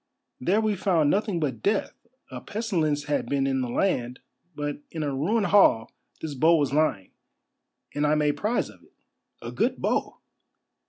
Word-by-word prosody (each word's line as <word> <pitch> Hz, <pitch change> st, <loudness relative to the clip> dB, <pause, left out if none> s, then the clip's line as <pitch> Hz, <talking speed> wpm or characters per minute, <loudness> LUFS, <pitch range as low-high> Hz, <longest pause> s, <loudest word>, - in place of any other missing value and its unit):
There 185 Hz, +11 st, +2 dB
we 215 Hz, -2 st, +1 dB
found 170 Hz, -6 st, +2 dB
nothing 205 Hz, -3 st, 0 dB
but 135 Hz, -8 st, -2 dB
death; 205 Hz, 0 st, 0 dB, 0.4 s
a 125 Hz, -1 st, -7 dB
pestilence 165 Hz, -, -1 dB
had 145 Hz, 0 st, -1 dB
been 140 Hz, -1 st, +1 dB
in 135 Hz, -1 st, 0 dB
the 125 Hz, -, -3 dB
land, 125 Hz, -5 st, -1 dB, 0.4 s
but 145 Hz, 0 st, -4 dB
in 160 Hz, -2 st, -4 dB
a 145 Hz, -2 st, -2 dB
ruined 200 Hz, +11 st, +1 dB
hall 175 Hz, -, +4 dB, 0.3 s
this 155 Hz, -2 st, -4 dB
bow 160 Hz, +5 st, +4 dB
was 145 Hz, -4 st, 0 dB
lying, 145 Hz, -11 st, +1 dB, 0.8 s
and 145 Hz, +1 st, +1 dB
I 150 Hz, -, +3 dB
made 150 Hz, -1 st, +1 dB
prize 220 Hz, +4 st, -1 dB
of -, -, -20 dB
it. -, -, -25 dB, 0.5 s
A -, -, -5 dB
good -, -, 0 dB
bow!" -, -, -1 dB
150 Hz, 170 wpm, -26 LUFS, 140-195 Hz, 0.8 s, hall